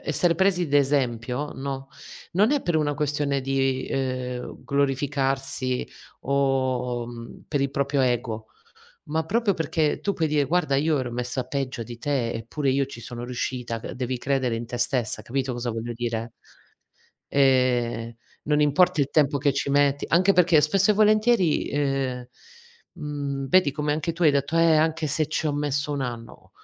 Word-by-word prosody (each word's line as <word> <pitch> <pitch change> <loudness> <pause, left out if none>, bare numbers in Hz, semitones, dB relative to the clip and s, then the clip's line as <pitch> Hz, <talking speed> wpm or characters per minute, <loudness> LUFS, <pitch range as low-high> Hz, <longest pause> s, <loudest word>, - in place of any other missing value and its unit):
essere 170 +3 +1
presi 180 -1 +2
d'esempio, 135 -2 0
no, 135 0 -5 0.4
non 205 +7 +3
è 290 -1 +2
per 175 - -1
una 150 -1 +1
questione 145 -1 0
di, 135 -1 0
ehm, 130 -2 -3
glorificarsi 135 -2 -1 0.3
o, 130 -3 0
mhmm, 120 -1 -10
per 145 - 0
il 140 0 0
proprio 140 0 0
ego, 120 -3 -1 0.6
ma 160 +2 -2
proprio 215 +3 +1
perché 160 -2 0
tu 200 - -1
puoi 160 -4 0
dire: 145 -1 +2
"Guarda, 165 -2 +1
io 150 +2 +2
ero 125 -2 -3
messa 125 +2 -3
peggio 130 -3 -3
di 120 +1 -9
te, 125 -2 -1
eppure 125 +6 -2
io 135 +1 +2
ci 125 -3 -10
sono 120 +1 -7
riuscita, 125 -1 -3
c - - -7
devi 130 0 -3
credere 130 -2 0
in 115 +1 -4
te 120 +1 -5
stessa.", 120 -2 -1
capito 130 +3 -2
cosa 120 0 -3
voglio 115 +1 -4
dire? 115 -1 -3 1.0
Ehm, 125 -4 +2 0.3
non 150 0 +2
importa 150 +2 +3
il 140 - +1
tempo 145 -2 +3
che 140 +1 +2
ci 140 0 -2
metti, 145 0 +2
anche 185 +4 +4
perché, 175 -4 +5
spesso 190 +7 +3
e - - +4
volentieri, 215 -4 +3
ehm, 135 -3 -1 0.7
mhmm, 145 -4 -4
vedi 185 -3 +4
come 150 +1 -1
anche 155 +2 -2
tu 170 +1 -1
hai 150 - +6
detto: 140 +3 0
"Eh, 165 -1 +5
anche 160 +1 +1
se 155 +1 0
ci 155 - -1
ho 150 - +1
messo 145 0 -1
1 140 - -2
anno." 120 -2 -7
140 Hz, 170 wpm, -25 LUFS, 125-150 Hz, 1.0 s, hai